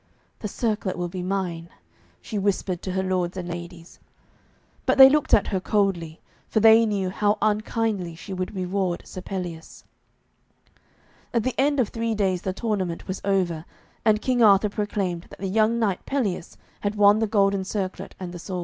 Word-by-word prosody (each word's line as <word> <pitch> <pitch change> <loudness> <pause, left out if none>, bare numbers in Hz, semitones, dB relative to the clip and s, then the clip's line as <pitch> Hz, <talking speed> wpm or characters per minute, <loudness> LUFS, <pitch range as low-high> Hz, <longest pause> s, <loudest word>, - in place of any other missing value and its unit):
'The 210 - -4
circlet 210 -3 -2
will 175 0 -2
be 180 +1 -6
mine,' 180 -3 -3 0.5
she 215 - -3
whispered 190 -2 -1
to 185 - -4
her 190 0 0
lords 185 -1 -1
and 180 -1 -4
ladies. 170 0 -8 0.9
But - - +3
they 265 -1 +11
looked 300 0 +1
at 205 - +4
her 190 - 0
coldly, 185 -5 0 0.3
for 220 - +1
they 225 +1 +7
knew 195 -3 -1
how 205 +2 +1
unkindly 215 -4 -1
she 165 +4 -8
would 185 +2 -4
reward 185 -1 -1
Sir 185 - -8
Pelleas. 175 -4 -6 1.5
At 230 - +2
the 255 - -1
end 285 +2 +2
of 240 - +2
three 230 -1 -2
days 190 -4 0
the 190 - -2
tournament 190 -5 -3
was 190 - -4
over, 180 -5 0 0.4
and 215 -1 +3
King 250 -2 +1
Arthur 205 -1 +6
proclaimed 195 -4 -3
that - - -13
the 195 - -4
young 220 +4 +2
knight 205 -5 0
Pelleas 210 -11 -2 0.2
had 205 +1 -2
won 205 0 +5
the 220 - +1
golden 200 -2 +2
circlet 190 -1 -4
and 180 -2 -6
the 175 - -7
sword. 185 +1 -5
195 Hz, 175 wpm, -24 LUFS, 180-215 Hz, 1.5 s, they